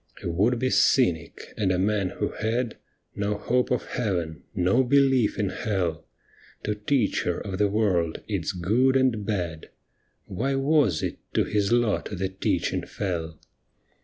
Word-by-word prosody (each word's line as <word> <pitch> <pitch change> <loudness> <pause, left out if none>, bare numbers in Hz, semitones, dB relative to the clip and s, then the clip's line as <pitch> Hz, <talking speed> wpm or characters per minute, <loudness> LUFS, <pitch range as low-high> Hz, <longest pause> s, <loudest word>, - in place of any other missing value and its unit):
A - - -2
would 105 +9 +2
be 130 +2 0
cynic, 85 - +2
and 100 -3 +1
a 90 - +1
man 100 0 +1
who - - -3
had 115 +2 -2 0.4
No 100 +1 -1
hope 125 +4 0
of - - 0
Heaven, 85 - -2
no 95 +9 +3
belief 135 -3 +3
in 100 -2 0
Hell, 95 -8 -2 0.6
To 105 - 0
teach 105 +2 0
her 90 - -1
of 95 -2 -5
the 105 -1 +3
world, 95 -6 +1
its - - -1
good 115 +10 +2
and 125 -5 +1
bad, 85 -6 -3 0.6
Why 130 +9 -2
was 135 - +2
it - - -3 0.2
to - - +4
his 105 0 0
lot 120 -3 +1
the 95 -1 -2
teaching 95 0 -1
fell 85 -4 -4
105 Hz, 155 wpm, -26 LUFS, 90-120 Hz, 0.6 s, to